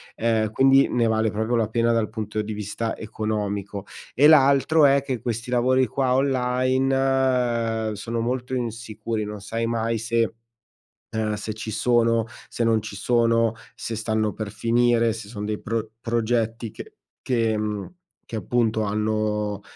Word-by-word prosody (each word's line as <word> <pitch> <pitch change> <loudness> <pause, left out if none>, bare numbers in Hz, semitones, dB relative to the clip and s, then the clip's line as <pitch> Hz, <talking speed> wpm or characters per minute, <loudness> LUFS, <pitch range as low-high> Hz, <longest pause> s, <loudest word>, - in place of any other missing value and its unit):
Eh, 110 -1 +1
quindi 135 +1 +5
ne 120 -1 +1
vale 110 0 +2
proprio 110 +3 -1
la 110 -2 +1
pena 115 +1 +1
dal 115 -2 +1
punto 110 -1 -3
di 105 0 -5
vista 105 +2 -3
economico. 105 -2 -3 0.3
E 145 +3 +6
l'altro 145 +1 +5
è 140 0 +5
che 130 -3 -3
questi 120 +1 -4
lavori 130 +1 +3
qua 130 +2 0
online 130 -3 +1
sono 115 +3 -4
molto 125 +2 -2
insicuri, 115 -2 -3
non 105 0 -6
sai 115 +3 -3
mai 115 0 0
se, 115 0 0 0.8
ehm, 110 -1 -1
se 105 +1 -5
ci 110 0 -6
sono, 115 0 +2 0.2
se 120 - -3
non 110 -2 +3
ci 105 -2 -8
sono, 115 +1 +2 0.2
se 115 - -5
stanno 110 -1 0
per 110 -2 -5
finire, 115 +1 +2
se 110 -2 -8
sono 105 -2 -6
dei 105 0 -3
pro 110 0 -3
progetti 115 -1 -1
che - - -10 0.3
che, 115 -4 +1
mhmm, 105 - -3 0.3
che - - -7
appunto, 110 +1 0
hanno 105 0 -1
115 Hz, 150 wpm, -24 LUFS, 110-120 Hz, 0.8 s, E